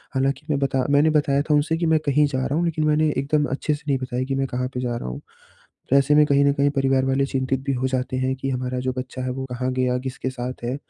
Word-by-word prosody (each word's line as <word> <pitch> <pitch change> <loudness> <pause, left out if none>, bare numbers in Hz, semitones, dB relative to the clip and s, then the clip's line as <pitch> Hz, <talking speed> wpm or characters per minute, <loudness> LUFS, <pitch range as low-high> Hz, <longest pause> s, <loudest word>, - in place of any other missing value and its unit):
हालाँकि 135 +2 0
मैं 145 - +1
बता 135 -1 0
मैंने 145 +2 +4
बताया 145 -2 +2
था 150 +1 0
उनसे 155 +2 +1
कि 170 - -1
मैं 160 -1 +3
कहीं 145 +1 +3
जा 130 -2 -2
रहा 140 - -1
हूँ, 170 +2 +1
लेकिन 155 -2 0
मैंने 155 +1 +3
एकदम 150 +2 +1
अच्छे 145 +3 -1
से 150 - -7
नहीं 140 -2 +2
बताया 130 -1 -3
कि 135 +1 -2
मैं 135 0 0
कहाँ 125 0 -2
पे 125 - -3
जा 120 -1 -2
रहा 90 - -5
हूँ। 60 - -7 0.7
वैसे 140 +1 +4
में 150 0 +6
कहीं 140 -1 +3
न 140 - +4
कहीं 140 0 +2
परिवार 135 -1 +1
वाले 135 +1 +1
चिंतित 135 -1 -1
भी 140 - 0
हो 130 0 -1
जाते 130 0 -2
हैं 130 0 0
कि 135 +1 -3
हमारा 125 -1 -2
जो 130 0 -2
बच्चा 130 0 -5
है, 130 - -2
वो 130 +1 -4
कहाँ 125 +1 -2
गया? 125 -1 +1
किसके 130 0 -4
साथ 125 -1 -6
है? 120 +2 -2
135 Hz, 275 wpm, -23 LUFS, 130-145 Hz, 0.7 s, में